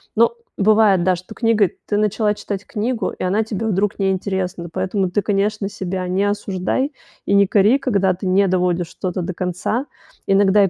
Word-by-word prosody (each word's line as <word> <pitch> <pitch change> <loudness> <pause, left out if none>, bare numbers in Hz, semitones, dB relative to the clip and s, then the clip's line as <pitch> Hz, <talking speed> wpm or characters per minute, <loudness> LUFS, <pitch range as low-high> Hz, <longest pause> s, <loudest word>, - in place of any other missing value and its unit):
Но 230 - +4 0.2
бывает, 210 -3 +4
да, 185 0 +3
что 185 +5 -11
книга, 225 -5 +3 0.2
ты 205 - 0
начала 210 0 +1
читать 200 -2 -5
книгу, 230 +2 -2
и - - -7
она 200 +4 +1
тебе 220 0 -3
вдруг 205 0 0
не 195 -1 +2
интересна, 185 -2 -3
поэтому 190 +1 -1
ты, 205 - +1
конечно, 205 0 0
себя 185 -2 -4
не 185 +2 0
осуждай 205 +7 -1 0.3
и - - 0
не 200 0 +6
кори, 210 +6 +4
когда 200 -8 +1
ты 185 +3 -7
не 195 +2 +3
доводишь 180 -2 +1
что-то 180 +1 -4
до 185 - -4
конца. 180 +9 -2 0.4
Иногда 195 +1 +4
и - - 0
195 Hz, 185 wpm, -20 LUFS, 185-210 Hz, 0.4 s, не